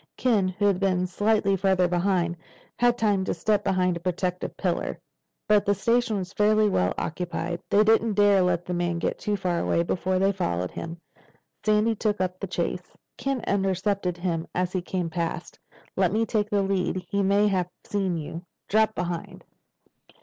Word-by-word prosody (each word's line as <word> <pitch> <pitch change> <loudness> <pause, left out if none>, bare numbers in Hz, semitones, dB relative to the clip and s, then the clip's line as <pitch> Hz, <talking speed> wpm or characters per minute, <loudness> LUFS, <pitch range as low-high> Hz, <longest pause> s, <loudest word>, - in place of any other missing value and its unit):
Ken, 220 -7 +2
who 185 +3 -1
had 200 -3 +3
been 185 -2 +1
slightly 205 +1 +1
farther 190 -1 +2
behind, 175 -1 +1 0.4
had 240 0 +3
time 205 -4 +2
to - - -1
step 210 -1 +1
behind 180 -1 +1
a - - -4
protective 180 +1 -3
pillar. - - -2 0.5
But 210 -1 +4
the 205 0 +2
station 230 +2 +1
was 190 0 -5
fairly 215 +1 +3
well 90 - +1
occupied. 175 +1 -3
They 210 - +5
didn't 225 0 +3
dare 205 -1 +5
let 175 -1 +1
the 180 - -3
man 175 -1 -1
get 170 - -2
too 210 - -1
far 180 -2 -1
away 170 - +1
before 185 +2 -1
they 195 +1 +3
followed 90 - -2
him. 165 +1 -7 0.6
Sandy 215 +1 +3
took 210 -1 -1
up 185 0 -2
the 195 - -4
chase. 180 0 -3 0.2
Ken 275 -2 -2
intercepted 195 -2 0
him 170 -2 -2
as 180 0 -1
he 185 - 0
came 175 -2 -3
past. 170 0 -4 0.4
"Let 185 -2 +2
me 220 +3 +1
take 210 -2 -1
the 205 -1 +1
lead. 185 -1 -1
He 200 +3 0
may 200 +2 +3
have 180 -3 0 0.2
seen 195 -4 -1
you. 160 +2 -6 0.3
Drop 220 +1 +2
behind." 175 -1 -4
190 Hz, 180 wpm, -26 LUFS, 175-205 Hz, 0.6 s, They